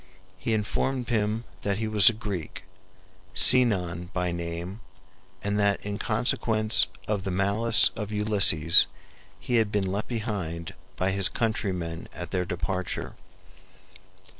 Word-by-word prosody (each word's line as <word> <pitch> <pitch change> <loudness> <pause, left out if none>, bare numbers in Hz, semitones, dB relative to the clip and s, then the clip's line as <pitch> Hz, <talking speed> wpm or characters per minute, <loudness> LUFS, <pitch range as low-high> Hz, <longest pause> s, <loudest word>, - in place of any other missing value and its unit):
He 110 +4 -1
informed 125 +4 -2
them 110 -1 -1 0.2
that 100 -1 -1
he 110 0 -3
was 110 +1 +5
a - - -2
Greek, 105 -7 -6 0.7
Sinon 90 -9 +3
by 90 -1 -1
name, 85 +3 -6 0.6
and 100 +1 -1
that 100 -1 +2
in 100 0 -4
consequence 110 -1 +1 0.2
of 105 -3 -2
the 95 - -3
malice 100 +4 +4
of 105 -1 -5
Ulysses 100 -7 +4 0.5
he 120 - -1
had 110 -2 +1
been 105 -2 0
left 100 +3 -3
behind 100 -8 -5 0.2
by 95 +1 0
his 95 0 +5
countrymen 90 -7 -3
at 90 - -7
their 90 -2 -1
departure. 90 +1 -4
100 Hz, 130 wpm, -26 LUFS, 90-110 Hz, 0.7 s, was